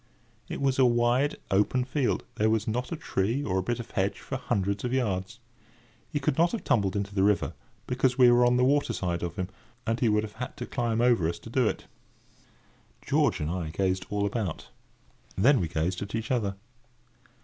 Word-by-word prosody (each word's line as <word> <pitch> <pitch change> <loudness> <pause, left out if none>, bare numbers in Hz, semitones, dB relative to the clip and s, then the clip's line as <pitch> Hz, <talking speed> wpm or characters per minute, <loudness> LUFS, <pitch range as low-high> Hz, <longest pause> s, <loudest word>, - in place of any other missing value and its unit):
It - - -4
was 135 -1 +1
a - - +7
wide, 120 +4 +2 0.2
open 105 +6 +2
field. 130 0 0
There 110 +1 +1
was 110 -1 0
not 125 +3 -2
a - - -1
tree 115 -1 -1
or 95 -6 0
a - - +1
bit 120 +6 -2
of 120 - -8
hedge 95 0 -1
for - - -5
hundreds 100 0 -1
of 125 - -1
yards. 105 -4 -1 0.7
He 145 - -1
could 145 +1 0
not 170 +1 +4
have 230 - -3
tumbled 100 -4 +1
into 100 0 -2
the 95 - +1
river, 100 0 +2 0.3
because 125 0 +1
we 125 -2 +7
were 120 0 +5
on 120 0 +4
the 125 - +3
water 145 +3 +2
side 85 -2 -2
of 85 -1 -4
him, 90 -1 -3 0.4
and 115 +1 0
he 120 - +3
would 105 0 +2
have 105 -1 -7
had 125 - -5
to 120 - -4
climb 115 -2 -1
over 120 -10 +3
us 85 - -4
to 115 - -11
do 125 -2 +2
it. - - -3 1.2
George - - +2
and 75 +1 -2
I 85 -3 -3
gazed 95 +2 -1
all 100 0 0
about. 100 -5 -3 0.7
Then 125 +7 +5
we 85 - -1
gazed 85 +3 -2
at 100 +2 -4
each 115 +5 -3
other. 105 -6 0
110 Hz, 210 wpm, -28 LUFS, 95-125 Hz, 1.2 s, a